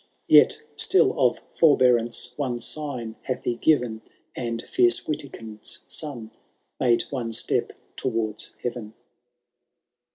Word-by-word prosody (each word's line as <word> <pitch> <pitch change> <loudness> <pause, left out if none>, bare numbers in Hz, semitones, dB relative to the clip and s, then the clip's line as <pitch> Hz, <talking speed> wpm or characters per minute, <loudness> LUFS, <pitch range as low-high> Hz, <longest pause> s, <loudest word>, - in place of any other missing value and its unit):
Yet - - +6
still 380 - +4
of - - +2
forbearance 125 -6 +3
one 125 -4 -2
sign 125 -6 -5
hath 130 -2 -4
he 120 - -1
given. 120 -5 +1 0.3
And 115 -2 -3
fierce 360 -1 +3
Witikind^ 115 -8 -5
son 125 -8 -4 0.5
made 120 -2 +3
one 120 -4 -3
step - - 0 0.2
towards 110 -4 -2
heaven. 120 -3 -5
120 Hz, 105 wpm, -25 LUFS, 115-140 Hz, 0.5 s, Yet